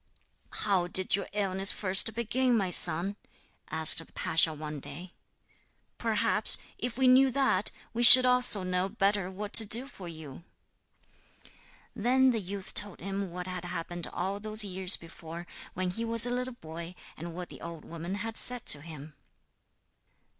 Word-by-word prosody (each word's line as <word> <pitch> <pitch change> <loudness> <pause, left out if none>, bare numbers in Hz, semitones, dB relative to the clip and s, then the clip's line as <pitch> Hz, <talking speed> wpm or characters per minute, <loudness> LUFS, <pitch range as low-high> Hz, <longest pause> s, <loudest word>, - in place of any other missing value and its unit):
'How 190 -4 -1
did 185 +1 0
your 200 - -5
illness 195 -1 -2
first 200 +3 +2
begin, 240 +2 0
my 190 -4 -2
son?' 175 +4 +4 0.5
asked 160 +1 +2
the 165 - -10
pasha 160 0 +2
one 150 -1 -8
day. 175 +6 -11 0.9
'Perhaps, - - +4 0.2
if 245 -1 -4
we 265 -1 +2
knew 260 +1 +5
that, 250 -7 0 0.2
we 235 - -3
should 255 +2 +11
also 250 -5 +2
know 185 +1 -2
better 200 -2 -1
what 205 +2 -8
to 225 - +6
do 225 +5 +2
for 195 -10 -12
you.' 160 -2 -11 1.5
Then 255 +4 +2
the 230 - -2
youth 195 +1 -7
told 205 -2 -2
him 195 +1 -5
what 180 +1 -7
had 185 -1 -6
happened 175 -1 -5
all 195 +2 -4
those 215 +1 -1
years 190 -1 0
before, 165 0 -11 0.3
when 185 0 -3
he 230 +6 -5
was 230 0 +4
a 245 - -4
little 250 0 -4
boy, 170 -2 -10 0.2
and 165 +1 -9
what 180 0 -8
the - - -13
old 170 -2 -9
woman 170 +3 -7
had 225 +2 -5
said 250 -2 -3
to 145 - +1
him. 155 -2 -11
190 Hz, 160 wpm, -28 LUFS, 175-225 Hz, 1.5 s, should